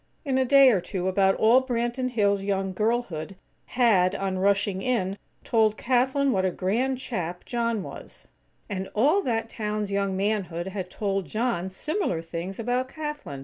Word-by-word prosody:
In 265 -2 +1
a 260 - +2
day 275 0 +7
or 195 -6 +1
two 185 0 -3
about 190 0 +3
all 235 +4 +5
Branton 245 0 -1
Hills' 200 -4 +1
young 195 -1 -1
girlhood 195 -6 -1 0.4
had, 200 -8 +4
on 190 -1 -2
rushing 200 0 +1
in, 195 -5 0 0.3
told 220 -2 +2
Kathlyn 265 +2 +2
what 190 -4 +1
a 190 - +2
grand 230 +9 -1
chap 180 -9 -4
John 230 -4 -1
was; - - -10 0.4
and 190 -2 -4
all 295 - +4
that 230 - -1
town's 210 -2 -3
young 200 -1 0
manhood 190 -4 -1
had 190 -2 -5
told 195 -3 -2
John 215 - -1
similar 190 - -2
things 170 +4 -6
about 245 +3 -1
Kathlyn. 295 - -6
210 Hz, 160 wpm, -26 LUFS, 190-245 Hz, 0.4 s, day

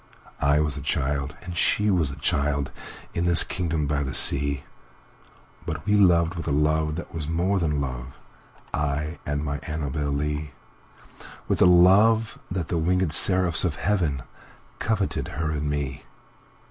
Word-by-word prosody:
I 70 +1 +3
was 75 -2 -2
a - - -6
child 70 0 -2
and 90 -1 -7
she 105 +4 +1
was 85 -6 +1
a 70 - -7
child, 70 -1 -1 0.4
In 85 - -2
this 85 -1 +9
kingdom 80 -4 -3
by 70 0 -1
the 65 -2 -4
sea, 70 0 +2 1.0
But 80 -2 -6
we 105 0 +2
loved 85 -4 +3
with 85 -1 -7
a - - -1
love 75 +1 0
that 85 - -8
was 80 -3 -5
more 90 +5 0
than 75 -4 -1
love,I 70 +3 -6
and 75 0 -2
my 70 0 -3
Annabel 75 -2 -4
Lee; 75 0 -3 0.9
With - - -1
a - - +7
love 100 +6 +4
that 90 -3 -4
the 85 - -1
wingèd 90 +1 0
seraphs 90 +1 +5
of 85 -4 -2
heavenCoveted 95 - -3
her 80 -1 -2
and 75 -1 -3
me. 70 -2 -4
75 Hz, 150 wpm, -24 LUFS, 70-90 Hz, 1.0 s, this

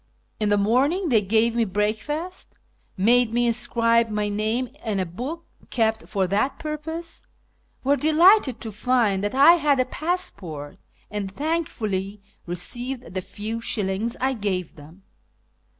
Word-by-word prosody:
In 210 -1 +1
the 205 - +3
morn 240 +8 +3
ing 370 -2 -2
they 225 -5 +4
gave 220 +3 +2
me 235 - +3
breakfast, 220 - -3 0.4
made 235 +4 +4
me 240 +1 +1
inscribe 230 0 +2
my 210 -1 -1
name 220 +4 -1
in 215 -4 -1
a 185 - 0
book 255 - -6 0.2
kept 220 -2 0
for 195 -3 +1
that 205 +9 0
purpose, 320 +2 -5 0.6
were 280 +2 +3
delighted 315 - +5
to 220 - -5
find 210 -2 +1
that 205 +5 -2
I 280 +5 +8
had 290 -4 +2
a 255 - +3
passport, 200 - -4 0.3
and 205 -2 -3
thankfully 215 - -2 0.3
received 240 +8 -4
the 185 - -2
few 215 +4 -5
shillings 210 +2 -1
I 265 +1 +1
gave 195 -7 -3
them. 160 +6 -15
230 Hz, 145 wpm, -24 LUFS, 205-270 Hz, 0.6 s, I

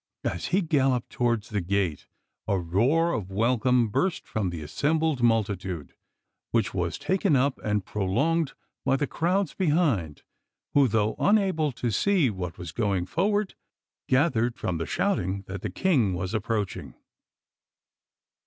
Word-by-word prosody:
As 85 - -2
he 190 +4 +2
galloped 135 -6 +1
towards 120 -3 0
the 105 -3 -1
gate 90 -3 -1 0.4
a 100 - +2
roar 120 - +2
of 105 -6 -3
welcome 120 +3 +2
burst 185 - 0
from 105 -4 -1
the 85 -3 -6
assembled 150 - 0
multitude, 100 -8 0 0.6
which 115 -4 0
was 85 -3 -1
taken 190 -4 +1
up 135 +1 +1
and 105 -3 0
prolonged 135 - 0 0.3
by 135 - +2
the 145 - 0
crowds 180 +4 0
behind, 145 - 0 0.5
who, 140 -2 +5
though 110 -1 +1
unable 190 -8 +2
to 120 -1 -2
see 170 - +2
what 90 -3 -5
was 85 -2 -7
going 100 -5 0
forward, 205 - 0 0.6
gathered 125 -4 +2
from 85 -3 -2
the 80 - -3
shouting 95 +2 -1
that 95 0 -7
the - - -3
King 130 - +1
was 90 +2 -3
approaching. 110 -2 -2
115 Hz, 140 wpm, -26 LUFS, 95-155 Hz, 0.6 s, who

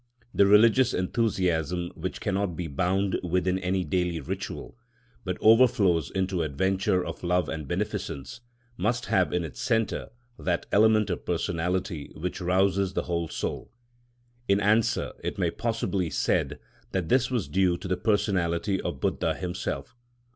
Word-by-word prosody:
The 100 - +5
religious 115 +5 +5
enthusiasm 90 - 0
which 90 +2 -5
cannot 100 -3 -1
be 90 - -4
bound 95 +6 0
within 90 +1 0
any 95 0 0
daily 90 -2 -1
ritual, 70 - -6 0.5
but 90 -3 -3
overflows 110 - +4
into 95 -2 -1
adventures 90 +5 0
of - - -6
love 90 -1 +1
and 80 -3 -5
beneficence, 70 - -4 0.4
must 120 +6 0
have 90 -2 +2
in 90 - 0
its 80 - -7
centre 115 -1 0 0.3
that 90 -2 -1
element 110 -1 +4
of 90 - -3
personality 85 -1 -2
which 90 +4 -4
rouses 95 +1 +2
the - - -1
whole 85 -1 -2
soul. - - -4 0.8
In 100 0 +3
answer, 110 +2 +2
it - - -3
may - - +1
possibly 110 -6 -1
be - - -5
said 65 -4 0 0.4
that 90 -4 -1
this 130 0 +3
was 120 -6 -1
due 90 -2 +2
to 95 - -7
the 90 - +1
personality 95 -2 0
of - - -4
Buddha - - 0
himself. 90 - -4
95 Hz, 145 wpm, -27 LUFS, 85-100 Hz, 0.8 s, The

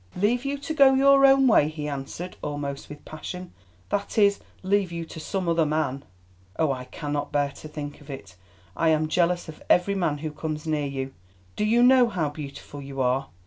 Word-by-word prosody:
"Leave 225 +7 +1
you 280 +1 -1
to 290 +3 -5
go 275 -3 +6
your 275 0 +6
own 270 0 +5
way," 215 - +5
he 155 -1 -5
answered 145 +6 -6
almost 145 -1 -4
with 150 0 -11
passion—"that 155 - -7
is, 200 -1 +4 0.2
leave 195 -1 +1
you 170 -1 -4
to 160 - -9
some 185 +3 -3
other 165 -1 +3
man. 150 -3 -1 0.5
Oh! 160 -3 +2
I 130 -1 -4
cannot 145 +2 -4
bear 145 -1 +1
to 155 - -11
think 150 -1 -7
of 145 - -16
it. 100 -10 -9 0.4
I 165 - +2
am 155 0 +2
jealous 175 +2 +1
of 155 - -10
every 180 +3 +4
man 170 -6 0
who 155 +1 -5
comes 155 0 -5
near 150 -2 0
you. 135 -1 -4 0.4
Do - - -1
you 230 +3 +4
know 250 -1 +6
how 165 -8 -1
beautiful 145 -1 -8
you 135 -1 -8
are? 130 +1 +1
155 Hz, 195 wpm, -25 LUFS, 145-200 Hz, 0.5 s, go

